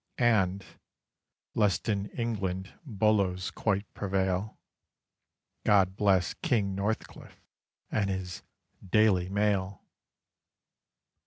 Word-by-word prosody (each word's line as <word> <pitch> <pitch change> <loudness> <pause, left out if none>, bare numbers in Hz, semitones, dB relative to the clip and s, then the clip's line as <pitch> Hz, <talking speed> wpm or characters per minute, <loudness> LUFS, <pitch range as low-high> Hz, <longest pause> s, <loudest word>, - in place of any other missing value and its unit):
And 100 -6 +2 0.9
lest 105 -1 +1
in 100 -2 0
England 95 -6 -3
Bolos 100 -5 +1
quite 100 -1 0
prevail 95 +1 -1 1.1
God 95 -2 +4
bless 95 -4 +2
King 100 -5 0
Northcliffe 100 +3 -4 0.5
and 100 -3 +1
his 95 -1 -4 0.4
"Daily 95 -2 +3
Mail!" 100 -1 0
100 Hz, 80 wpm, -29 LUFS, 95-105 Hz, 1.1 s, God